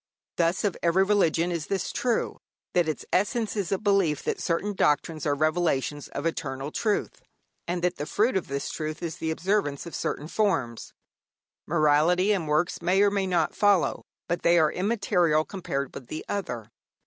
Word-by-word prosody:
Thus 170 +1 +1
of 200 -4 0
every 175 +3 +3
religion 180 -4 +2
is 165 -3 -3
this 195 -1 -2
true, 245 -2 -1 0.3
that 175 -2 +3
its 155 - -4
essence 215 +3 +1
is 200 -5 -2
a 195 - +2
belief 195 -7 +1
that - - -2
certain 195 +5 -1
doctrines 155 -2 +1
are 145 - +2
revelations 155 -2 0
of - - -6
eternal 140 -3 -3
truth, 210 +3 -1 0.5
and 175 0 -2
that 180 0 +1
the 145 - -4
fruit 225 +3 +1
of 190 - -1
this 140 0 -3
truth 155 0 -5
is 165 -1 -4
the 160 - -3
observance 170 -3 0
of 170 - -8
certain 150 - -3
forms. 160 - -1 0.8
Morality 160 +5 +3
and 185 -6 0
works 155 +5 0
may 180 +3 +2
or 205 - +4
may 200 -1 0
not 170 -4 +1
follow, 205 -3 +2 0.3
but 175 - -1
they 170 +1 +4
are 155 -2 +4
immaterial 180 -6 +1
compared 140 -8 -4
with 125 - -9
the 155 - -6
other. 120 - -4
170 Hz, 175 wpm, -26 LUFS, 155-195 Hz, 0.8 s, or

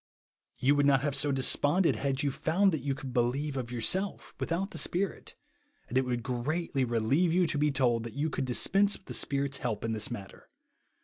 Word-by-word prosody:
You 135 +3 +3
would 145 0 +3
not 135 -2 +4
have 145 0 -1
so 145 +1 +2
des 135 -1 0 0.2
ponded 170 +5 +2
had 135 0 -1
you 140 - +1
found 185 +8 +2
that 155 -5 -2
you 140 0 -2
could 135 -3 -8
believe 135 +5 0
of 125 -3 -4
yourself, 185 - -1
without 190 +5 -2
the - - -2
Spirit; 185 0 -2 0.5
and 125 - -7
it 130 0 +3
would 120 -2 -2
greatly 135 +4 -2
relieve 125 +9 +1
you 180 +1 +3
to 155 -2 -1
be 150 +1 +3
told 125 -4 +1
that 115 - -8
you 145 +3 0
could 135 - -2
dispense 195 +11 +3
with - - -28
the - - -7
Spirit's 140 -1 0
help 115 -4 -3
in 115 - -1
this 110 -1 0
matter. 100 -5 -9
140 Hz, 210 wpm, -29 LUFS, 125-160 Hz, 0.5 s, not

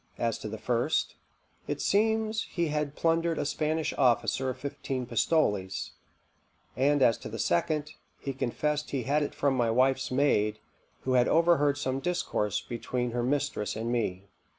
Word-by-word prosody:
As 115 -2 -1
to - - -6
the 110 - -5
first, 120 +2 0 0.5
it - - -2
seems 220 +1 +1
he 170 -3 -1
had 150 -1 -2
plundered 165 0 +1
a 145 - -1
Spanish 155 +2 -1
officer 130 0 +2
of 130 - -4
fifteen 130 -1 -4
pistoles; 105 - 0 0.8
and 140 +1 +3
as 115 - +4
to - - -7
the - - -6
second, 150 - 0 0.3
he 135 - -4
confessed 150 +4 -1
he 135 -3 -2
had 145 +5 +1
it 145 - -3
from 140 -1 +2
my 120 -3 +1
wife's 130 +3 +2
maid, 115 -6 +2 0.4
who 130 - -1
had 125 -1 +4
overheard 160 -4 +3
some 130 -2 -1
discourse 135 - -1
between 120 +1 -3
her 120 +1 -1
mistress 135 -3 -1
and 115 +2 -2
me. 100 -6 -1
135 Hz, 160 wpm, -29 LUFS, 120-150 Hz, 0.8 s, as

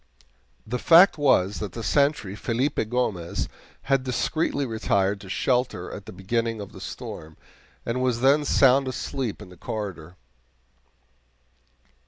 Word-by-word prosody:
The 125 +3 -3
fact 170 0 +6
was 105 -9 +3
that 100 -5 -5
the 115 - -6
sentry, 140 -10 +1
Felipe 115 0 -1
Gomez, 105 -9 -1 0.4
had 135 -1 +1
discreetly 140 +3 -1
retired 100 -4 0
to 95 - -11
shelter 125 -5 -1
at 100 - -9
the - - -7
beginning 115 +3 -2
of 100 - -8
the - - -12
storm, 80 0 -8 0.5
and 120 +2 -1
was 125 -2 0
then 140 +3 +4
sound 135 -1 +4
asleep 130 -3 -4
in 95 - -13
the 90 - -15
corridor. 90 -5 -6
115 Hz, 135 wpm, -25 LUFS, 100-135 Hz, 0.5 s, fact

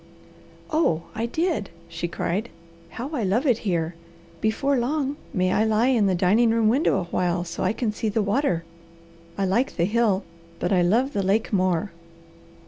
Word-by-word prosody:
"Oh 235 - +2
I 225 +2 -2
did!" 315 - -1 0.2
she 170 0 -4
cried. 185 +5 -2 0.4
"How 245 - -6
I 290 -7 -2
love 210 +9 +1
it 245 -5 +3
here! 170 -4 -1 0.5
Before 270 +6 +1
long 280 +3 -1 0.2
may 185 -6 +1
I 215 - +3
lie 220 +3 +2
in 230 -6 +3
the 190 - +2
dining 205 +7 +3
room 225 -1 +3
window 255 - +2
a - - -2
while 175 0 -1
so 170 - -6
I - - +2
can 225 0 -1
see 215 +1 -2
the 210 +1 0
water. 200 - 0 0.7
I 195 - +1
like 230 +8 +1
the 170 - +2
hill, 210 -1 +1 0.3
but - - -1
I 180 - +4
love 235 +10 +2
the 200 - 0
lake 200 +4 0
more." 185 0 +1
215 Hz, 180 wpm, -24 LUFS, 185-240 Hz, 0.7 s, I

